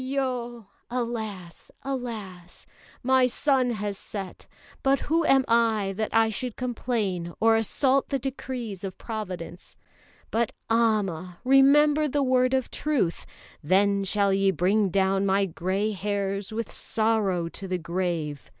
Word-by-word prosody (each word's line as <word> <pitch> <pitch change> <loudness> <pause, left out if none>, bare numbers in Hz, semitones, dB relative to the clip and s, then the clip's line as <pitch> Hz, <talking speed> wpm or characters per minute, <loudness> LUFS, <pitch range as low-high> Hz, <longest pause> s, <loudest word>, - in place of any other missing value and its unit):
Aiyo!" 250 -4 -3 0.2
(Alas! 220 -8 -5
Alas!) 215 -10 -6 0.4
"My 260 0 +4
sun 260 0 +1
has 205 -3 -3
set; 195 -3 -8 0.3
but 275 0 +3
who 330 +2 +1
am 270 -1 +4
I, 225 -4 +2
that 215 +1 -2
I 225 0 +3
should 245 +2 -4
complain 220 -8 -2
or 225 0 +5
assault 265 +5 +1
the 275 - +1
decrees 250 -6 -5
of 190 -2 -5
Providence? 185 -6 -7 0.5
But 230 0 0 0.2
Amma! 195 -7 +1
remember 290 +3 +5
the 285 0 0
word 255 0 +3
of 260 -2 -1
truth: 280 - -1 0.4
'Then 200 +4 +3
shall 200 0 +2
ye 195 0 +3
bring 195 +2 +2
down 195 +1 +1
my 195 +1 +3
grey 190 +4 -1
hairs 200 0 -2
with 225 0 -4
sorrow 215 -6 0
to 195 - -7
the 185 0 -1
grave.'" 170 -4 -3
215 Hz, 130 wpm, -26 LUFS, 190-250 Hz, 0.5 s, or